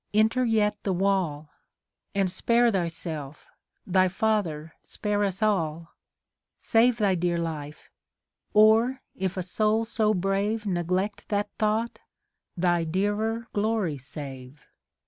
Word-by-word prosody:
enter 220 +4 +3
yet 220 -3 +2
the 195 - -1
wall; 175 -6 0 0.6
And 195 -1 +2
spare 235 +4 +3
thyself, 165 -6 -4 0.4
thy 185 0 +3
father, 180 -6 -1
spare 205 -1 -2
us 195 +1 -1
all! 165 -5 0 0.7
Save 235 +1 +3
thy 200 -4 +2
clear 175 0 0
life; 155 -3 -5 0.6
or, 225 +5 +5
if 190 0 -3
a 185 - -1
soul 215 +4 +1
so 215 -2 +1
brave 200 +4 0
Neglect 185 +2 -2
that 205 0 -1
thought, 220 +2 0 0.6
thy 175 -1 +2
clearer 205 +7 -1
glory 205 -8 0
save. 135 0 -9
195 Hz, 115 wpm, -26 LUFS, 170-215 Hz, 0.7 s, or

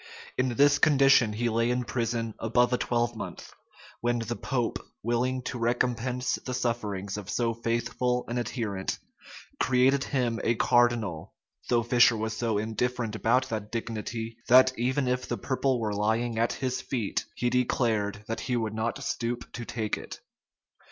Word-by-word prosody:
[*] - - -17
In 130 -2 +1
this 145 +3 +5
condition 135 -6 +5
he 120 +3 -1
lay 115 +1 +1
in 125 0 0
prison 115 -1 -2
above 120 +2 +2
a - - +3
twelvemonth; 120 -1 -2 0.5
when 120 0 +1
the 115 0 -3
pope, 125 -2 -2 0.2
willing 125 +3 0
to 120 - -4
recompense 125 +1 0
the 125 - -3
sufferings 105 -5 -2
of 105 -1 -7
so 115 0 0
faithful 120 +2 -1
an 120 +1 -2
adherent, 110 -6 -3 0.6
created 130 +2 +3
him 120 -4 0
a 115 - +2
cardinal 120 -9 +1 0.3
though 120 -1 +3
Fisher 120 -1 +5
was 110 +1 -2
so 115 -3 0
indifferent 115 +1 -2
about 125 +4 +2
that 105 -2 -4
dignity, 115 0 -4
that, 130 +1 +7
even 130 +3 0
if 125 0 -1
the - - -2
purple 130 -1 0
were 110 -2 -1
lying 110 +3 0
at 115 - +2
his 130 -1 -2
feet, 115 -7 -2
he 120 0 0
declared 110 -5 0
that 115 - -3
he 125 -1 -1
would 110 -2 -2
not 110 +1 -2
stoop 120 0 -3
to 120 - -5
take 110 -2 -2
it. - - -9
120 Hz, 160 wpm, -28 LUFS, 110-125 Hz, 0.6 s, that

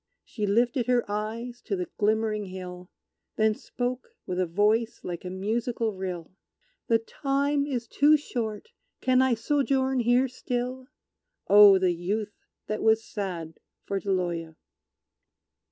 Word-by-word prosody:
She 210 -3 -3
lifted 240 +4 +2
her 245 -1 +2
eyes 225 +4 -4
to 205 - -2
the 180 -1 -2
glimmering 215 0 +1
hill, 180 -1 -8 0.5
Then 220 0 +3
spoke, 245 +3 -5
with 180 0 -3
a 185 - +1
voice 210 +6 +1
like 175 -1 -5
a 180 - -5
musical 220 +4 -1
rill, 185 -3 -5 0.6
"The 230 - +4
time 280 +4 -1
is 245 -5 -3
too 295 +5 +5
short; 235 - -4 0.3
can 255 0 +3
I 260 -2 +3
sojourn 265 +1 +1
here 245 +2 +3
still?" 255 +1 -4 0.6
Oh, 205 -1 +9
the 185 -1 +2
Youth 205 +5 -3 0.3
that 215 - -3
was 220 0 +3
sad 175 -7 -5 0.2
for 200 - -2
Deloya! 175 -4 -2
220 Hz, 135 wpm, -27 LUFS, 190-245 Hz, 0.6 s, Oh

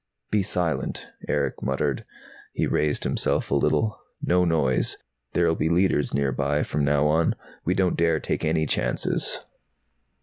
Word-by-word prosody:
"Be 105 - +3
silent," 90 -4 -1 0.2
Erick - - -1
muttered. 65 0 -1 0.5
He - - 0
raised 75 -1 0
himself - - 0
a - - +3
little. 110 -1 +1 0.2
"No 90 0 +2
noise. 75 -6 +1 0.4
There'll 85 -2 +3
be 80 0 0
Leiters 85 -4 +2
nearby, 70 +1 0
from 75 - -1
now 70 +1 +3
on. 80 +2 +2 0.3
We 90 - +1
don't 95 -2 +1
dare 85 -1 +2
take - - -2
any 80 0 +1
chances." - - -1
80 Hz, 140 wpm, -25 LUFS, 75-90 Hz, 0.5 s, Be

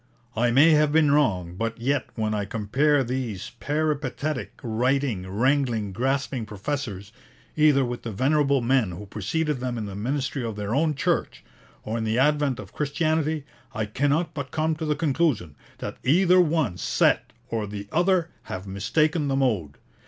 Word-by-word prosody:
'I 120 +2 +2
may 140 +7 +6
have 150 -1 +4
been 155 -2 +4
wrong, 95 -13 +2
but 115 +3 -3
yet 135 +3 0
when 110 -2 -1
I 105 -1 -1
compare 135 +8 +1
these 120 -6 -4
peripatetic, 150 -1 -2
writing, 120 -4 0
wrangling, 120 -1 +1
grasping 130 0 -1
professors, 105 -2 -4 0.4
either 150 -3 +4
with 120 0 -4
the 115 - -5
venerable 140 +4 +2
men 120 -6 +2
who 105 +5 -8
preceded 135 - -2
them 125 -1 -3
in 110 - -3
the 100 - -6
ministry 130 +5 -2
of 115 -2 -3
their 105 +1 -3
own 155 +3 +2
Church, - - -1 0.4
or 110 +2 -3
in - - -2
the 110 +1 0
advent 145 -1 +2
of - - -10
Christianity, 155 0 0 0.3
I 110 - -1
cannot 145 +9 0
but 140 -3 -5
come 155 +3 0
to 160 - -3
the 150 -1 +1
conclusion 145 - 0 0.2
that - - -6
either 180 +6 +5
one 155 - +1
set - - +2 0.2
or 110 -2 -2
the 100 0 -7
other 175 0 +2
have 95 +1 -6
mistaken 145 - 0
the 135 - 0
mode. 110 - 0
130 Hz, 165 wpm, -25 LUFS, 110-150 Hz, 0.4 s, may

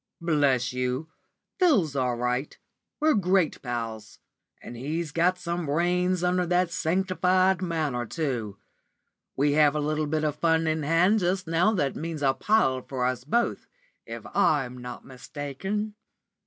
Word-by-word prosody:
"Bless 140 -7 +1
you, 125 +5 -2 0.5
Phil's 220 - +3
all 125 -2 0
right. 125 +3 -2 0.4
We're 310 0 +4
great 185 -4 +1
pals. 115 -4 -5 0.4
And 120 - -10
he's 155 +6 -3
got 175 +4 +2
some 170 -2 -3
brains 180 +4 +1
under 180 0 +1
that 180 0 +1
sanctified 185 +1 +1
manner, 155 -9 -2
too. 120 -9 -3 0.8
We 145 +2 +2
have 150 0 +4
a - - 0
little 155 +1 -1
bit 155 +1 -1
of 150 -2 0
fun 165 0 +2
in 160 0 0
hand 170 +8 +3
just 185 0 0
now 170 +7 +2
that 145 -9 0
means 160 -2 -5
a 135 -1 +4
pile 135 -10 +2
for 125 -1 -3
us 125 -1 -1
both, 235 +11 0 0.4
if - - -7
I'm 130 -4 +2
not 125 0 -8
mistaken." 145 +11 -5
155 Hz, 145 wpm, -26 LUFS, 130-180 Hz, 0.8 s, We're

